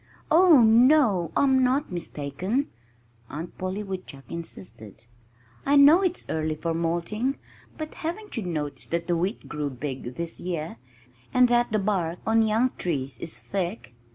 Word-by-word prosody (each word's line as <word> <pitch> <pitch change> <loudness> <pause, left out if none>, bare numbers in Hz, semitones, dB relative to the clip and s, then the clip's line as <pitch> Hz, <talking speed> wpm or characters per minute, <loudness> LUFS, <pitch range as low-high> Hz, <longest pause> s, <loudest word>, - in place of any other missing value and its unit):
"Oh, 330 -4 +7
no! 225 - +5
I'm 265 -2 +4
not 265 +1 +1
mistaken," 180 - -3 0.6
Aunt 160 +4 -7
Polly 185 +3 -3
Woodchuck 185 -8 -8
insisted. 115 - -8 0.6
"I 280 - +2
know 290 +6 +8
it's 365 -2 -1
early 155 0 -1
for 165 +2 -2
molting 170 +10 -1 0.4
but 310 -1 -6
haven't 395 +6 -5
you 230 - -2
noticed 155 -6 -4
that 170 0 -1
the 175 0 +1
wheat 185 +7 -2
grew 150 -1 -3
big 130 -1 -6
this 170 -1 -5
year, 170 -3 -4 0.6
and 250 0 +6
that 240 -1 +2
the 215 - +2
bark 190 -5 -1
on 225 +1 +3
young 225 +3 +2
trees 135 -7 -2
is 165 - -6
thick? 190 - -4
185 Hz, 150 wpm, -26 LUFS, 165-250 Hz, 0.6 s, know